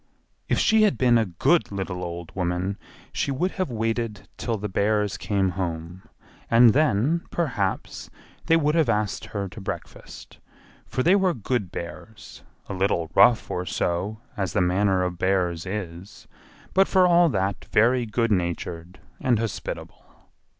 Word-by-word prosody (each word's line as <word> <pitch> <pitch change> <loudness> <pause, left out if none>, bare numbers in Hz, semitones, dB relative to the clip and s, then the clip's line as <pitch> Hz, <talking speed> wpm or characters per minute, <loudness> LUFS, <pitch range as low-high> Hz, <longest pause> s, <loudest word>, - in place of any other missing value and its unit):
If - - +2
she 220 0 +4
had 210 -2 +3
been 120 -2 +4
a 110 - 0
good 105 - +1
little 95 -2 -4
old 85 -1 -7
woman 90 +1 -2 0.3
she - - -1
would 170 +8 0
have 185 -5 -2
waited 115 -2 -2
till 115 -2 -2
the 105 +1 -4
bears 105 0 0
came 100 -2 0
home, 85 -1 -4 0.5
and 115 -1 +6
then, 150 +3 +2
perhaps, 120 - -2 0.4
they 165 - +5
would 150 -1 +1
have 160 -6 +2
asked 105 -3 -1
her 100 -2 -4
to 90 +4 -10
breakfast, 95 - -8 0.5
for 130 - -1
they 180 +4 +5
were 190 -4 +2
good 115 -3 -2
hears—a 100 +4 -10
little 90 -4 0
rough 120 -2 +5
or 90 - -2
so, 95 +6 -2 0.2
as 95 -5 -2
the - - +2
manner 95 +1 +2
of 90 -1 -3
bear's 90 -2 0
is, 95 0 -7 0.5
but 195 +1 +4
for 185 -1 +4
all 175 -1 +5
that 100 -4 -2
very 120 +2 +2
good 115 +1 0
natured 85 -1 -3 0.2
and 125 -3 +2
hospitable. 110 -2 -5
105 Hz, 150 wpm, -24 LUFS, 90-125 Hz, 0.5 s, and